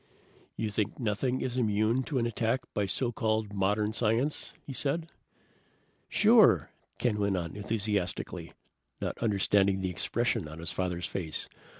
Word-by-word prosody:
"You 110 -1 -1
think 105 0 -1
nothing 125 +3 0
is 130 -1 -2
immune 110 +1 +2
to 145 - -2
an 120 - +2
attack 115 +2 0
by 100 -1 0
so 120 +4 -1
called 110 -2 0
modern 105 +2 +1
science?" 120 +6 +1
he 135 - -6
said. 160 +5 -1 1.0
"Sure!" 210 - +5 0.3
Ken 110 -4 0
went 100 -2 +1
on 85 -1 -4
enthusiastically, 105 -3 -2 0.5
not - - -2
understanding 100 -2 +3
the 95 -1 -1
expression 115 +2 0
on 75 +1 -9
his 85 +1 -3
father's 90 -1 -2
face. 85 -5 -3
105 Hz, 140 wpm, -30 LUFS, 95-120 Hz, 1.0 s, Sure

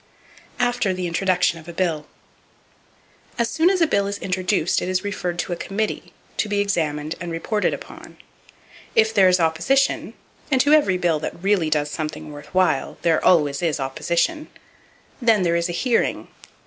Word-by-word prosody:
After 245 -6 +1
The 180 0 -3
Introduction 180 -1 +1
Of 160 - -15
A 170 - -7
Bill. 165 -4 -1 1.3
—As 235 -2 0
soon 325 +3 +3
as 380 -2 +1
a - - +6
bill 200 -10 +1
is 200 0 -3
introduced 185 -2 0
it 180 - -3
is 185 +1 0
referred 180 -4 -3
to 175 - -2
a - - -2
committee, 205 +5 -3 0.3
to 210 - 0
be 205 0 0
examined 155 -6 -1
and 175 -1 -4
reported 205 +6 -1
upon. - - -9 0.8
If 220 0 +4
there 195 -3 +5
is 180 0 +3
opposition,—and 255 - 0
to 290 +3 +3
every 200 -12 +4
bill 170 -4 +1
that 170 +3 -6
really 195 -5 +2
does 150 -1 0
something 155 0 -5
worth 145 0 -10
while 185 -4 0
there 165 -2 +2
always 145 -5 +3
is 160 -4 0
opposition,—then 220 - -2
there 170 -1 +1
is 170 0 0
a - - -1
"hearing." 235 +7 0
180 Hz, 165 wpm, -22 LUFS, 165-210 Hz, 1.3 s, a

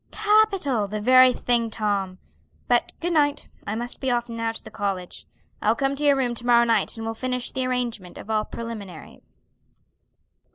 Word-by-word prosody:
"Capital! 405 - +2
The 210 +2 -4
very 255 +3 +6
thing, 240 -2 0
Tom! 200 -4 -2 0.5
But - - +2
good 345 +1 -2
night. 290 -2 +1 0.2
I 210 - -2
must 240 +2 -5
be 265 - -1
off 240 -1 0
now 230 0 -2
to 225 - -9
the - - -11
college. 195 -4 -4 0.3
I'll 220 +2 +2
come 270 +2 0
to 290 - -3
your 285 -1 +5
room 255 -3 0
to 240 0 -6
morrow 235 -1 +6
night 230 0 +1
and 225 - -5
we'll 225 - -2
finish 250 +1 -3
the 260 -1 -2
arrangement 240 -7 -3
of - - -10
all 215 -1 0
preliminaries." 215 -8 -9
235 Hz, 180 wpm, -24 LUFS, 215-260 Hz, 0.5 s, very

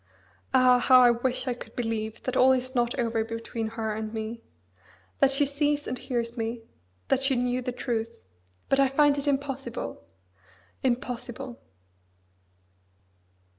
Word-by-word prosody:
Ah! 250 -1 +5
how 255 +1 +6
I 245 -1 +7
wish 245 +2 -1
I 250 - +1
could 245 - -11
believe 225 -2 -3
that 255 - -2
all 260 +1 +6
is 255 0 -2
not 240 -1 0
over 230 -2 0
between 230 0 -4
her 220 -1 -3
and 215 0 -4
me; 220 +1 -5 0.8
that 275 - +5
she 275 +1 +2
sees 290 +1 +1
and 250 - -4
hears 235 -2 -3
me; 230 0 -3 0.5
that 265 - +3
she 270 0 +2
knew 250 +1 0
the 250 - -3
truth. 230 -2 -2 0.6
But 270 - +2
I 275 - +5
find 290 +1 +4
it 280 - -4
impossible! 270 - -3 0.8
impossible! 245 0 -3
245 Hz, 145 wpm, -27 LUFS, 230-265 Hz, 0.8 s, I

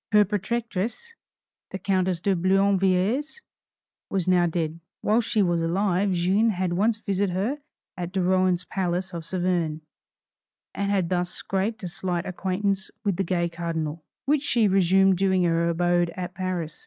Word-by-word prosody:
Her 210 0 +6
protectress, 225 - -3 0.6
the - - -5
countess 185 -2 0
de 195 +2 +1
Boulainvilliers, 195 - +2 0.7
was 190 -3 -1
now 180 -1 +4
dead; 165 -1 -2 0.2
while 220 +3 +3
she 220 -2 +1
was 175 -2 +1
alive 190 +3 +1
Jeanne 190 +6 +2
had 185 -3 -1
once 215 +5 +2
visited 200 -3 -1
her 230 +11 -1 0.4
at 180 -1 -5
de 195 - -1
Rohan's 185 -1 +2
palace 180 0 -2
of 170 -1 -5
Saverne, 175 -3 -1 0.9
and 200 0 -2
had 190 -4 +1
thus 180 -1 0
scraped 195 +3 -3
a - - -2
slight 175 0 -3
acquaintance 190 +1 -1 0.2
with 200 -4 +1
the 195 - +1
gay 175 -1 0
Cardinal, 165 -2 -4 0.2
which 290 0 +2
she 235 -7 +2
resumed 190 0 +4
during 190 -1 +2
her 170 0 +2
abode 175 0 +2
at 180 -1 -4
Paris. 180 -4 -3
185 Hz, 155 wpm, -25 LUFS, 175-200 Hz, 0.9 s, Her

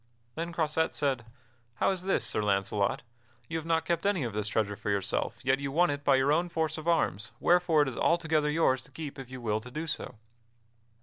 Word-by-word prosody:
Then 165 +4 -4
Croisette 160 -1 0
said: 135 -5 0 0.5
"How - - +2
is 185 -2 -2
this, 195 +1 +1
Sir - - 0
Launcelot? 100 +1 0 0.4
You 165 - -3
have 160 - -9
not 165 -1 +1
kept 170 +3 0
any 195 -7 +1
of 115 -4 -3
this 105 0 -2
treasure 105 -1 0
for 105 - -5
yourself, 100 -2 -1
yet 130 +1 +2
you 140 -1 -3
won 175 +3 +3
it 145 0 -4
by 140 -1 +5
your 135 +2 +3
own 175 +3 +1
force 160 -2 -1
of 155 - -8
arms, 115 - +1
wherefore 175 -3 +4
it - - -3
is 130 - -5
altogether 160 -3 +2
yours 150 -4 +2
to 135 - -16
keep 145 0 -7
if 130 -2 -8
you 130 0 -7
will 110 -2 -1
to 120 - -10
do 155 +6 -4
so." 140 -5 -4
145 Hz, 225 wpm, -29 LUFS, 120-165 Hz, 0.5 s, by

